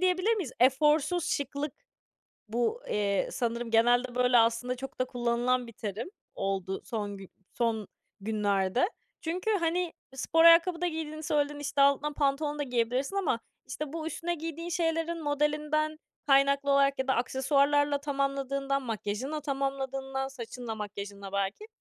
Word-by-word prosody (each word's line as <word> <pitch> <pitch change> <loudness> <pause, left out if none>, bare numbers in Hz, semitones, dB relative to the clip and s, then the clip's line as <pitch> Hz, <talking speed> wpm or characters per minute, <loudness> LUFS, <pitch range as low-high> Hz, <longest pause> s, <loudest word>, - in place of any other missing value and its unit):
diyebilir 370 +4 +3
miyiz? 355 - -4
Eforsuz 300 +6 +3
şıklık 285 0 -2 0.8
bu, 240 - 0
eee, 200 -1 +1
sanırım 235 -1 -2
genelde 245 +2 +3
böyle 250 0 +4
aslında 230 +2 +2
çok 270 +2 -8
da - - +4
kullanılan 245 0 0
bir 230 - -11
terim 215 - -5 0.2
oldu 195 -1 -2
son 205 -3 -4
gü 195 -1 -11 0.2
son 225 -3 0 0.3
günlerde. 205 - +1 0.3
Çünkü, 355 +5 -2
hani, 350 -3 +1 0.2
spor 325 +5 +2
ayakkabı 335 +1 +7
da 355 - +1
giydiğini 315 -2 -4
söyledin, 295 -1 0
işte, 285 0 -2
altına 280 +1 +4
pantolon 290 +1 0
da - - 0
giyebilirsin 250 +6 -1
ama, 365 -12 +1 0.3
işte, 280 +2 -5
bu 320 -1 -4
üstüne 340 +1 -2
giydiğin 330 +1 -5
şeylerin 330 -1 -1
modelinden 300 +1 0 0.3
kaynaklı 280 0 +4
olarak 275 0 +4
ya 265 0 -2
da 265 - +4
aksesuarlarla 280 +3 +2
tamamladığından, 275 -1 -1
makyajınla 235 +5 -3
tamamladığından, 270 -1 -2
saçınla, 245 -3 -6
makyajınla 200 -2 -7
belki 200 - -2
275 Hz, 140 wpm, -29 LUFS, 235-305 Hz, 0.8 s, ayakkabı